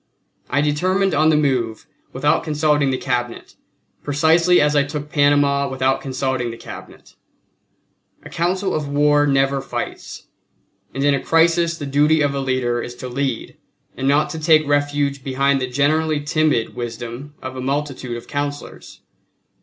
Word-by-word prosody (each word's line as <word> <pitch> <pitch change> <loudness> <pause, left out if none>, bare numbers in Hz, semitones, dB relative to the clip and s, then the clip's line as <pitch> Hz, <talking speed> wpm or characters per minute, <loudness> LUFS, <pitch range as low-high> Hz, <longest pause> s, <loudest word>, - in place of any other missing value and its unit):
I 145 - +1
determined 185 +7 +1
on 155 +2 +3
the 155 - +3
move 125 -7 -1 0.3
without - - +1
consulting 150 -2 +1
the 130 - 0
Cabinet, 120 -2 -3 0.5
precisely 165 +4 +3
as 150 0 +2
I 145 - +5
took 145 +1 -6
Panama 145 -1 +2
without 130 0 0
consulting 130 -2 -2
the 115 - -8
Cabinet. - - -12 1.1
A - - -10
council 185 +3 -1
of 150 -2 -2
war 145 +1 +3
never 135 0 +1
fights, - - -6 0.7
and 135 - -3
in 145 0 +4
a 140 - +1
crisis 165 +1 +2
the 145 - -6
duty 150 +3 +3
of 145 -1 +1
a 140 - -2
leader 130 -3 -1
is 120 - -7
to 125 - -7
lead 130 -1 -3 0.4
and 135 - -3
not 145 +2 +2
to 160 - -5
take 155 -1 +4
refuge 145 -1 0
behind 135 +1 +1
the 130 - -1
generally 150 +4 +1
timid 150 -5 0
wisdom 120 +4 -7
of 130 0 -7
a 130 - -5
multitude 135 -3 -3
of 120 - -11
councillors. 145 0 -6
145 Hz, 155 wpm, -20 LUFS, 130-150 Hz, 1.1 s, I